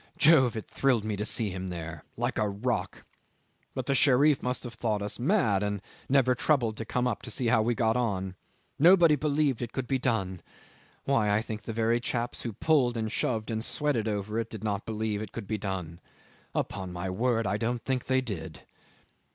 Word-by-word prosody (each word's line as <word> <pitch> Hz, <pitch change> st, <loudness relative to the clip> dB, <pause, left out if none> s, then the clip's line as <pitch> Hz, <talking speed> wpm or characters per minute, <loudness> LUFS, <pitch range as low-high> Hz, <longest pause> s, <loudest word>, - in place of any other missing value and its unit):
Jove! 145 Hz, -6 st, +5 dB
It 110 Hz, -, -4 dB
thrilled 125 Hz, -6 st, +1 dB
me 110 Hz, -1 st, -1 dB
to 100 Hz, -, -3 dB
see 110 Hz, -2 st, +1 dB
him 95 Hz, +1 st, -5 dB
there 85 Hz, -2 st, -6 dB
like 120 Hz, +2 st, -1 dB
a 105 Hz, -1 st, +1 dB
rock. 115 Hz, +4 st, -3 dB, 0.7 s
But 130 Hz, -, -3 dB
the 140 Hz, -, +1 dB
Sherif 140 Hz, +1 st, +5 dB
must 125 Hz, 0 st, -2 dB
have 120 Hz, -2 st, -7 dB
thought 110 Hz, -3 st, -1 dB
us 105 Hz, -, -3 dB
mad, 120 Hz, -, +2 dB
and 105 Hz, 0 st, -1 dB, 0.3 s
never 130 Hz, -2 st, +4 dB
troubled 120 Hz, -4 st, +1 dB
to 115 Hz, -, -4 dB
come 125 Hz, +3 st, -1 dB
and 125 Hz, -4 st, 0 dB
see 120 Hz, +1 st, 0 dB
how 115 Hz, -2 st, +4 dB
we 120 Hz, +2 st, +1 dB
got 110 Hz, -1 st, +2 dB
on. 95 Hz, -6 st, -1 dB, 0.4 s
Nobody 170 Hz, 0 st, +7 dB
believed 145 Hz, -3 st, 0 dB
it 120 Hz, -2 st, -4 dB
could 130 Hz, -, -2 dB
be 135 Hz, 0 st, 0 dB
done. 95 Hz, -8 st, -1 dB, 0.6 s
Why! 115 Hz, -7 st, +2 dB
I 105 Hz, -, +3 dB
think 110 Hz, -2 st, -5 dB
the 115 Hz, -, -6 dB
very 115 Hz, +1 st, +1 dB
chaps 120 Hz, 0 st, -2 dB
who 115 Hz, -, -4 dB
pulled 125 Hz, -1 st, +2 dB
and 110 Hz, -1 st, -2 dB
shoved 110 Hz, -1 st, -1 dB
and 110 Hz, 0 st, -1 dB
sweated 140 Hz, -7 st, 0 dB
over 105 Hz, +1 st, -2 dB
it 115 Hz, -1 st, -3 dB
did 110 Hz, -2 st, -8 dB
not 105 Hz, -2 st, -2 dB
believe 110 Hz, -1 st, -2 dB
it 110 Hz, -2 st, -7 dB
could 115 Hz, -, -6 dB
be 110 Hz, +1 st, -3 dB
done! 90 Hz, -4 st, -4 dB, 0.6 s
Upon 95 Hz, -1 st, -3 dB
my 90 Hz, +1 st, -4 dB
word 115 Hz, +3 st, +1 dB
I 100 Hz, +1 st, 0 dB
don't 120 Hz, +2 st, -2 dB
think 130 Hz, -2 st, -1 dB
they 130 Hz, 0 st, +3 dB
did. 80 Hz, -10 st, -6 dB
115 Hz, 200 wpm, -28 LUFS, 105-125 Hz, 0.7 s, Nobody